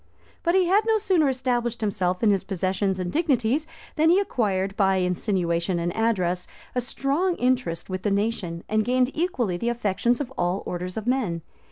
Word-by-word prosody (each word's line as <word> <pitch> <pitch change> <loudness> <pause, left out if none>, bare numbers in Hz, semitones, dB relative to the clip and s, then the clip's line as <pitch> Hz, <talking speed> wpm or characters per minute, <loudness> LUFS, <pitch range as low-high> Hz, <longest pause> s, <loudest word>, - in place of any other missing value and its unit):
[] - - -31
But 340 +1 +2
he 375 -1 +4
had 385 +4 +4
no 445 -1 +4
sooner 365 -8 +2
established 245 -2 -1
himself 185 -2 -1
in 215 - +5
his 195 -2 +1
possessions 190 0 -1
and 180 -1 -2
dignities, 290 -2 +1 0.3
than 315 +1 +4
he 360 +3 +5
acquired, 195 - -1
by 195 -2 +3
insinuation 180 -1 0
and 170 0 -2
address, 185 -6 0 0.3
a 250 - 0
strong 285 +9 0
interest 245 - 0
with 185 -1 -4
the 205 - 0
nation, 200 -5 -1
and 215 0 +1
gained 250 +2 +2
equally 255 - 0
the 235 +6 -1
affections 235 0 0
of 265 -2 -4
all 175 +3 0
orders 180 +2 -4
of 220 - -4
men. 225 -11 0
220 Hz, 185 wpm, -25 LUFS, 185-260 Hz, 0.3 s, in